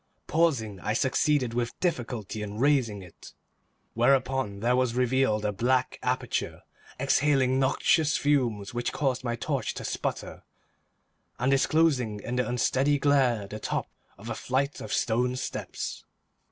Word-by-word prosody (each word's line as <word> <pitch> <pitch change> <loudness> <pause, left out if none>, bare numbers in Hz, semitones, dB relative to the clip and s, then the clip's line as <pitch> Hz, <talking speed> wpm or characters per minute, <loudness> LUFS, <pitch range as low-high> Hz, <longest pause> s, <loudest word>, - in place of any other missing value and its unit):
Pausing, 130 - +1
I 105 +4 -2
succeeded 130 0 +1
with 120 0 -2
difficulty 120 - -2
in 105 0 -5
raising 120 -7 +1
it, 90 - -14 0.6
whereupon 130 -3 +1
there 120 +2 +2
was 125 -2 +1
revealed 125 -4 +1
a 105 - +1
black 125 +5 0
aperture, 125 0 -2 0.4
exhaling 135 -2 +2
noxious 145 +3 +2
fumes 125 -7 0
which 120 0 -2
caused 130 -3 -1
my 120 -1 -1
torch 130 -1 -2
to - - -6
sputter, - - -4 1.0
and 130 +2 +1
disclosing 135 -6 +2
in 120 +4 -4
the 125 -2 +1
unsteady 130 +4 +2
glare 135 -7 +2
the 105 +2 -7
top - - -2 0.3
of 100 +3 -11
a 120 - -2
flight 135 +5 -2
of - - -7
stone 125 +2 +1
steps. 130 - -5
125 Hz, 140 wpm, -27 LUFS, 115-135 Hz, 1.0 s, there